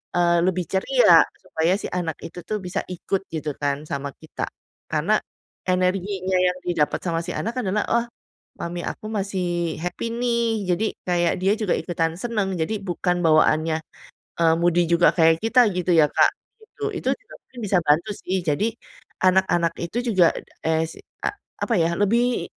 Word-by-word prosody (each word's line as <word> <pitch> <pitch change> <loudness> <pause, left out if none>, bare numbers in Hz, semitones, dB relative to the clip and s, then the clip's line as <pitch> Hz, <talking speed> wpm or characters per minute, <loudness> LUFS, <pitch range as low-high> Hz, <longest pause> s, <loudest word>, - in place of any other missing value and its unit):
eee, 175 -1 +3
lebih 180 -1 0
ceria, - - +5 0.2
supaya 165 +3 0
si - - -7
anak 170 -3 -3
itu 175 +1 -8
tuh 215 - -2
bisa 185 +1 -3
ikut 190 +2 -3
gitu 155 -2 -3
kan 140 0 0
sama 140 0 -3
kita. 160 - -5 0.4
Karena - - +2 0.5
energinya 185 +1 0
yang 180 0 +2
didapet 170 -4 0
sama 165 -2 -1
si 180 - -4
anak 230 +4 -3
adalah, 205 0 0
"Oh, 235 0 +2 0.6
mami 175 0 -4
aku 215 - -5
masih 180 -5 -2
happy 180 +6 -3
nih." 235 -4 0
Jadi 180 +5 +1 0.2
kayak 175 -1 +2
dia 195 +2 +3
juga 215 -4 0
ikutan 165 -2 -1
seneng, 210 -3 -1
jadi 215 +7 -1
bukan 180 -1 -1
bawaannya, 155 0 +4 0.6
eee, 165 -1 +4
moody 175 0 +3
juga 170 0 +5
kayak 165 +1 +3
kita 245 0 +5
gitu 180 0 0
ya, 155 -2 +6
Kak, - - +4 0.3
gitu. 440 0 -12
Itu - - -2
juga - - -18
mungkin 255 - -13
bisa 195 -2 +2
bantu 155 +7 +2
sih. 190 0 -2
Jadi 185 +9 +1 0.5
anak-anak 185 -2 +3
itu 195 +8 -3 0.2
juga 175 -3 +6 0.3
es 160 0 0 0.3
a - - +1 0.3
apa 235 - 0
ya, 170 +1 +1
lebih 235 +5 +2
180 Hz, 160 wpm, -23 LUFS, 165-205 Hz, 0.6 s, ya